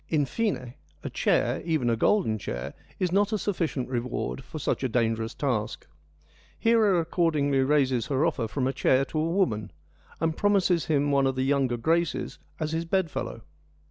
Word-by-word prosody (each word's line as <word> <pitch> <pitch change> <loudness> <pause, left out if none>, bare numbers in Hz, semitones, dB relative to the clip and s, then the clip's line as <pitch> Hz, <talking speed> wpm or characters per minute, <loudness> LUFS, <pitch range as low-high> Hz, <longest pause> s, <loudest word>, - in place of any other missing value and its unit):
In 150 -3 +2
fine, 130 - -2 0.3
a - - -5
chair, - - +1
even 155 -7 0
a 115 - +3
golden 115 - +2
chair, 65 -4 -5 0.2
is 180 -3 0
not 200 +3 +2
a 215 - +1
sufficient 170 -10 -2
reward 125 +1 -3
for 155 - -8
such 140 - -1
a 130 - +1
dangerous 115 -1 0
task. 120 -7 -2 0.7
Hera 220 -5 +3
accordingly 155 -5 +1
raises 130 -3 +2
her 140 +1 +1
offer 135 -9 0
from 130 +4 -2
a 135 - 0
chair 130 0 +2
to 155 - -3
a 160 +2 0
woman, 115 - 0 0.5
and 160 0 0
promises 190 -4 +2
him 145 -2 +1
one 140 -1 +3
of 135 - -1
the 130 - 0
younger 135 -3 +1
Graces 165 +6 0 0.2
as 155 -1 -2
his 165 +1 -2
bed 175 -1 0
fellow. - - -5
145 Hz, 175 wpm, -27 LUFS, 125-170 Hz, 0.7 s, a